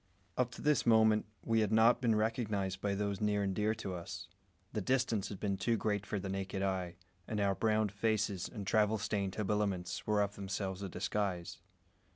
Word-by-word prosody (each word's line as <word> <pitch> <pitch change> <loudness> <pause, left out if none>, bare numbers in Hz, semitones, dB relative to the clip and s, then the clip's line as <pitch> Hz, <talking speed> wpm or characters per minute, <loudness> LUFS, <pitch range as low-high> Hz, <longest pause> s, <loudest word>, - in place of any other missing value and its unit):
Up 125 -1 +1
to - - -9
this 150 -5 +3
moment 110 -2 +5 0.2
we 115 -1 +3
had 105 -2 +1
not 115 +3 +5
been 115 -3 +3
recognised 105 -4 -1
by 100 -1 0
those 100 0 -2
near 105 -1 +2
and 95 -1 0
dear 105 +2 +1
to 100 -4 -5
us. 90 +1 -6 0.5
The 105 - -1
distance 120 -2 +1
had 100 - -7
been 100 -2 -1
too 115 +4 +1
great 105 -2 -1
for 105 - -1
the 95 - -4
naked 95 0 -3
eye, 95 -3 -1 0.3
and 110 - -2
our 100 -1 +3
browned 110 0 +1
faces 105 -2 0
and 105 -4 -6
travel 105 +2 +3
stained 100 -3 -2
habiliments 100 -4 -1
were 105 -1 +3
of 100 0 -3
themselves 95 -1 -4
a 100 - -4
disguise. 90 -1 -2
105 Hz, 195 wpm, -34 LUFS, 95-110 Hz, 0.5 s, moment